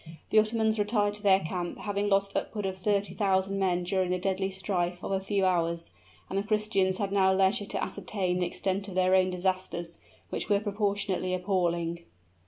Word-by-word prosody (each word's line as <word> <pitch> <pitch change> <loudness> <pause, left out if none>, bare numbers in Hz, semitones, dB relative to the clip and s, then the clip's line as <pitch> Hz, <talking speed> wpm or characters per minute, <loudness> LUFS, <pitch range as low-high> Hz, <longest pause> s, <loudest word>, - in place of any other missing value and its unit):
The 215 - +6
Ottomans 220 0 +1
retired 205 -1 +1
to 210 - -9
their 195 -2 +5
camp, 175 +1 -4
having 205 0 -1
lost 195 0 +1
upward 210 -2 -2
of 190 -1 -3
thirty 200 +1 0
thousand 195 -1 +1
men 180 -2 +1
during 185 0 0
the 180 - +1
deadly 190 +1 -1
strife 180 -2 -2
of - - -4
a 195 - +1
few 195 0 0
hours; 170 -2 0 0.4
and 195 - -1
the - - -2
Christians 205 -3 +1
had 200 -1 -2
now 190 -1 +4
leisure 195 +2 +2
to - - -2
ascertain 185 -2 -2
the 180 - +1
extent 195 +3 -2
of 190 - -7
their 185 0 +3
own 185 0 +4
disasters, 180 -2 -2 0.3
which - - -3
were 205 -1 +4
proportionately 200 -3 -1
appalling. 175 -3 0
190 Hz, 190 wpm, -29 LUFS, 185-205 Hz, 0.4 s, The